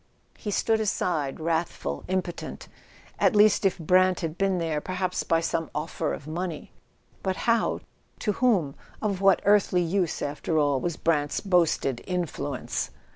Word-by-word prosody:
He 210 - -6
stood 220 +2 +1
aside, 165 -9 -1
wrathful, 160 - -2
impotent. 185 -2 -3 0.5
At - - +3
least 210 -1 +5
if 195 - +2
Brant 185 +2 +3
had 160 -1 -3
been 195 0 +1
there, 160 -3 -1
perhaps 185 +1 -2
by 165 0 +1
some 165 -1 -1
offer 150 +2 -2
of - - -6
money—but 175 +3 -6
how, 230 +2 +1 0.4
to 210 - 0
whom? 200 - +2 0.3
Of 200 -3 -2
what 195 -1 +4
earthly 200 -3 +4
use, 175 0 0
after 150 +3 -2
all, 145 -3 +3
was 170 +2 -2
Brant's 150 -3 +1
boasted 170 - +1
"influence"? 170 -7 -3
175 Hz, 140 wpm, -26 LUFS, 155-195 Hz, 0.5 s, least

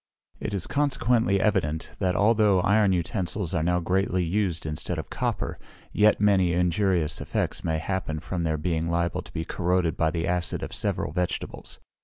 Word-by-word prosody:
It - - -4
is 95 - -2
consequently 125 -7 +1
evident, 90 -7 0
that 90 -2 +1
although 105 -3 +4
iron 105 +1 +3
utensils 90 0 -1
are 85 - +1
now 90 +2 +2
greatly 90 +1 0
used 90 -2 -1
instead 75 -1 -3
of - - -6
copper, - - -2 0.3
yet 105 0 +4
many 95 -4 +3
injurious 90 -2 +1
effects - - -2
may 80 -1 0
happen 80 -2 -3
from 85 +2 -4
their 80 -2 0
being 80 +1 -1
liable 85 -1 0
to - - -15
be 80 - -4
corroded 90 -2 0
by 80 - +2
the 80 0 -2
acid 90 -1 -1
of - - -6
several - - -2
vegetables. 90 +2 -4
90 Hz, 170 wpm, -26 LUFS, 80-100 Hz, 0.3 s, although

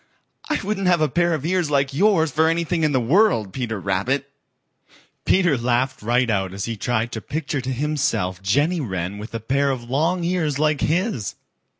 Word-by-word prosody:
I 305 - +1
wouldn't 195 -1 -1
have 175 -3 +3
a 155 - +4
pair 170 +1 +1
of 150 -1 -5
ears 180 -2 +1
like 140 -1 +1
yours 165 -2 +3
for 160 +3 +2
anything 165 0 0
in 155 - +3
the 130 - +2
world, 125 - +2
Peter 115 -5 -3
Rabbit." 125 +9 -1 0.9
Peter 180 -6 +3
laughed 125 +2 0
right 120 +3 +2
out 95 -4 -1
as 100 - -3
he 115 - -3
tried 115 +2 -1
to 110 - -5
picture 145 -1 -3
to 125 - -5
himself 135 -10 -1
Jenny 145 - +1
Wren 95 -4 -4
with 110 +2 -8
a - - -2
pair 140 +5 0
of 130 -3 -2
long 165 +6 +1
ears 170 -5 0
like 150 -1 +1
his. 175 - -1
140 Hz, 190 wpm, -22 LUFS, 115-165 Hz, 0.9 s, a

